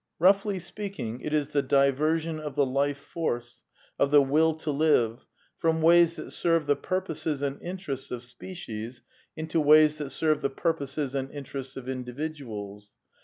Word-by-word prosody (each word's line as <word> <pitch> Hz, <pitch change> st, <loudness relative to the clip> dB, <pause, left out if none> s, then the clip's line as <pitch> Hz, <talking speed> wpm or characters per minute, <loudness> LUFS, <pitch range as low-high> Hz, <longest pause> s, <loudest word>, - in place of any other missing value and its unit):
Roughly 195 Hz, +3 st, +4 dB
speaking, 180 Hz, -, -5 dB
it 150 Hz, -, -4 dB
is 150 Hz, -2 st, +1 dB
the 145 Hz, -1 st, +1 dB
diversion 155 Hz, +4 st, +2 dB
of 150 Hz, -3 st, -6 dB
the 140 Hz, -, +3 dB
Life 140 Hz, +2 st, 0 dB
Force, 120 Hz, -6 st, -4 dB, 0.4 s
of 140 Hz, -, +3 dB
the 145 Hz, 0 st, +7 dB
Will 155 Hz, +4 st, +3 dB
to 155 Hz, -1 st, -3 dB
live, 140 Hz, -6 st, +2 dB, 0.3 s
from 160 Hz, 0 st, +2 dB
ways 170 Hz, 0 st, +6 dB
that -, -, -7 dB
serve 165 Hz, -2 st, +1 dB
the 145 Hz, 0 st, +3 dB
purposes 160 Hz, -6 st, -2 dB
and 140 Hz, 0 st, -2 dB
interests 175 Hz, -7 st, -5 dB
of 125 Hz, -1 st, -5 dB
species, 120 Hz, -4 st, -8 dB, 0.3 s
into 160 Hz, +1 st, 0 dB
ways 150 Hz, 0 st, +6 dB
tiiat 145 Hz, -2 st, -4 dB
serve 155 Hz, +1 st, +1 dB
the 140 Hz, -, +1 dB
purposes 140 Hz, -2 st, -2 dB
and 135 Hz, -1 st, -2 dB
interests 135 Hz, -2 st, -7 dB
of 130 Hz, -1 st, -8 dB
individuals. 125 Hz, -6 st, -6 dB
145 Hz, 160 wpm, -27 LUFS, 135-160 Hz, 0.4 s, the